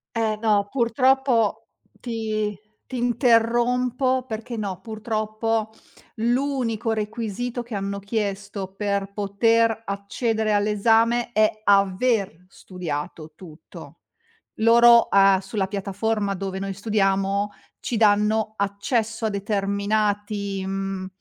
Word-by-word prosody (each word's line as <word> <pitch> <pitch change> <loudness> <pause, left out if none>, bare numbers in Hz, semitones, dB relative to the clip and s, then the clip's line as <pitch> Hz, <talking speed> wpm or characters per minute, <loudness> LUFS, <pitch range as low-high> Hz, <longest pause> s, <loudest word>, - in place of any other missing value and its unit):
Eh 220 -2 0
no, 210 -3 +2
purtroppo 255 -1 +1 0.3
ti 215 -3 -3 0.3
ti 255 - -6
interrompo 245 +2 +2
perché 230 +1 -5
no, 195 -4 -4
purtroppo 220 +1 -2 0.4
l'unico 240 -1 0
requisito 225 +2 -3
che 240 -1 -10
hanno 200 0 -3
chiesto 200 -2 -4
per 200 -1 -2
poter 225 +3 +2
accedere 215 +2 -1
all'esame 225 +3 +2
è 215 -2 +4
aver 195 -2 +2
studiato 160 -4 -6
tutto. 160 -3 -13 0.6
Loro, 235 +1 +6
a 195 -1 +5
sulla 195 0 -3
piattaforma 200 +1 -2
dove 190 0 -4
noi 195 0 -4
studiamo, 200 0 0 0.3
ci 240 - -3
danno 215 0 +2
accesso 215 +3 -1
a 220 - +1
determinati 200 0 -1
mhmm, 195 -1 -3
215 Hz, 100 wpm, -23 LUFS, 200-230 Hz, 0.6 s, Loro